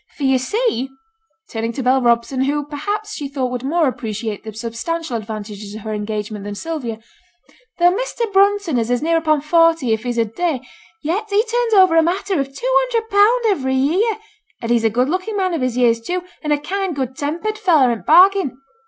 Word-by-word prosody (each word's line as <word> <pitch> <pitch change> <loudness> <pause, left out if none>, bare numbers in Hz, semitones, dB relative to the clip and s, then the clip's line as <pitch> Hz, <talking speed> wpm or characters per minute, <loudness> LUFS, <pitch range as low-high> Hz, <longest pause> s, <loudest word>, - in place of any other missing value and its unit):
For 290 - -5
yo' 265 -1 +4
see,' 270 - -1 0.6
(turning 230 +1 -3
to 265 - -4
Bell 260 +1 +3
Robson, 240 +2 +1
who, 290 +1 -1
perhaps, 410 +9 -4
she 290 -7 -4
thought 265 -3 -3
would 250 -1 -3
more 320 +3 +2
appreciate 220 -4 -4
the 220 - -7
substantial 235 +7 -4
advantages 210 -2 -6
of 220 - -7
her 215 +1 -5
engagement 210 0 -4
than 205 0 -6
Sylvia,) 260 -5 -4 0.8
'though 350 0 +5
Measter 480 0 -2
Brunton 395 -7 +3
is 245 +3 0
near 330 +1 +2
upon 310 -2 +1
forty 325 -5 +3
if 220 - -1
he's 240 0 -3
a 230 - +3
day, 280 +4 -2 0.4
yet 375 +8 -1
he 410 +2 +3
turns 470 -1 0
over 375 -4 +6
a 325 - +6
matter 365 +1 0
of 275 - 0
two 275 - -6
hundred 465 -3 -2
pound 420 +5 +4
every 265 -11 +1
year; 370 - +1 0.4
an 230 - -5
he's 235 -1 +2
a 225 - +4
good 245 +4 +1
looking 370 +6 -2
man 375 -2 0
of 325 - -2
his 255 -1 -1
years 230 -2 +3
too, 355 +8 -3 0.2
an' 300 - -2
a 295 - +4
kind, 380 +2 -3
good 260 -2 -3
tempered 340 +10 -3
feller 315 - +4
int' 230 - -3
t' - - -34
bargain. 365 -4 +5
290 Hz, 205 wpm, -19 LUFS, 235-370 Hz, 0.8 s, over